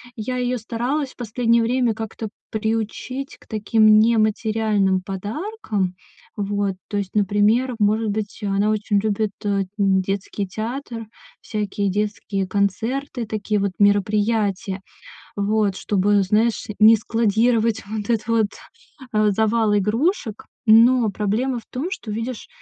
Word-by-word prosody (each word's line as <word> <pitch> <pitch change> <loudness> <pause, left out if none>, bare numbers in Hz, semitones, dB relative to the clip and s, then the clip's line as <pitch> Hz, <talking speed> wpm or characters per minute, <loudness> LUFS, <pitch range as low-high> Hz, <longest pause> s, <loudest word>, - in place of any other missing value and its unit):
я 250 +3 -3
её 250 0 0
старалась 250 +5 -2
в - - -23
последнее 235 0 +1
время 245 0 +1
как-то 220 0 -6 0.2
приучить 225 +5 -3
к - - -22
таким 215 0 +4
нематериальным 215 -3 +2
подаркам. 205 - -3 0.4
Вот, 200 -1 -1
то 210 - -5
есть, 200 -1 -4
например, 210 +5 +2
может 215 +1 +2
быть, 210 -1 -4
она 200 +1 +1
очень 210 -1 +1
любит 215 0 0 0.5
детский 195 0 0
театр, 230 +2 -5 0.3
всякие 205 -2 -2
детские 205 -1 -2
концерты, 230 +7 -1
такие 215 -1 -1
вот 200 -1 0
мероприятия. 205 -1 +1 0.6
Вот, 205 -1 +1
чтобы, 205 0 +2
знаешь, 215 +4 +1
не 220 +1 +8
складировать 225 +1 +1
вот 210 0 -5
этот 225 -1 -1
вот, 225 -2 +2 0.7
э, 215 -1 +3
завал 220 +1 +2
игрушек. 225 - 0 0.2
Но 230 +1 +6
проблема 225 +6 -1
в 225 - -18
том, 275 +8 -3
что, 225 - -5
видишь, 230 +2 -4
215 Hz, 120 wpm, -22 LUFS, 205-230 Hz, 0.7 s, не